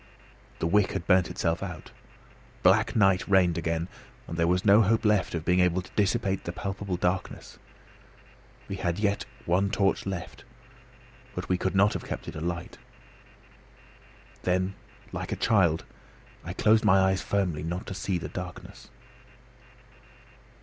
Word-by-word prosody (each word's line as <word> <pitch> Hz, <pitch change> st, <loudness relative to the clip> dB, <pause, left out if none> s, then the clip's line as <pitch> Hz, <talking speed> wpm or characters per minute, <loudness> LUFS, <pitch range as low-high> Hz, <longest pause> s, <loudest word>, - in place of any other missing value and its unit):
The -, -, -2 dB
wick 100 Hz, +4 st, +2 dB
had 85 Hz, -, -3 dB
burnt 90 Hz, -2 st, +4 dB
itself 85 Hz, -2 st, -1 dB
out. 90 Hz, -5 st, -7 dB, 0.7 s
Black 110 Hz, +6 st, +4 dB
night 95 Hz, -4 st, +3 dB
reigned 95 Hz, -4 st, +4 dB
again; 85 Hz, 0 st, -2 dB, 0.4 s
and 85 Hz, -, -6 dB
there 85 Hz, 0 st, +1 dB
was 90 Hz, +1 st, +1 dB
no 105 Hz, +2 st, +7 dB
hope 110 Hz, +2 st, +2 dB
left 105 Hz, -4 st, +2 dB
of 80 Hz, -1 st, -4 dB
being 90 Hz, 0 st, +3 dB
able 90 Hz, 0 st, +2 dB
to -, -, -15 dB
dissipate 100 Hz, -1 st, +1 dB
the 85 Hz, -, -4 dB
palpable 95 Hz, 0 st, -4 dB
darkness. 90 Hz, +1 st, -3 dB, 1.1 s
We -, -, -5 dB
had 85 Hz, 0 st, -1 dB
yet 100 Hz, -1 st, 0 dB, 0.2 s
a 90 Hz, +2 st, +3 dB
torch 100 Hz, 0 st, +1 dB
left, 95 Hz, -3 st, -6 dB, 0.9 s
but -, -, -4 dB
we 90 Hz, -1 st, +1 dB
could 95 Hz, -, -1 dB
not 100 Hz, +2 st, +4 dB
have -, -, -4 dB
kept -, -, -6 dB
it -, -, -7 dB
alight. 85 Hz, +2 st, -4 dB, 1.6 s
Then, 95 Hz, +1 st, 0 dB, 0.4 s
like -, -, -5 dB
a -, -, 0 dB
child, 90 Hz, -7 st, +2 dB, 0.6 s
I 90 Hz, -, -5 dB
closed 110 Hz, +4 st, +3 dB
my 95 Hz, -3 st, +5 dB
eyes 95 Hz, -1 st, +2 dB
firmly, 95 Hz, -6 st, -1 dB
not 85 Hz, +3 st, -4 dB
to -, -, -6 dB
see 95 Hz, -1 st, -2 dB
the 85 Hz, -, -5 dB
darkness. -, -, -8 dB
95 Hz, 150 wpm, -27 LUFS, 85-100 Hz, 1.6 s, no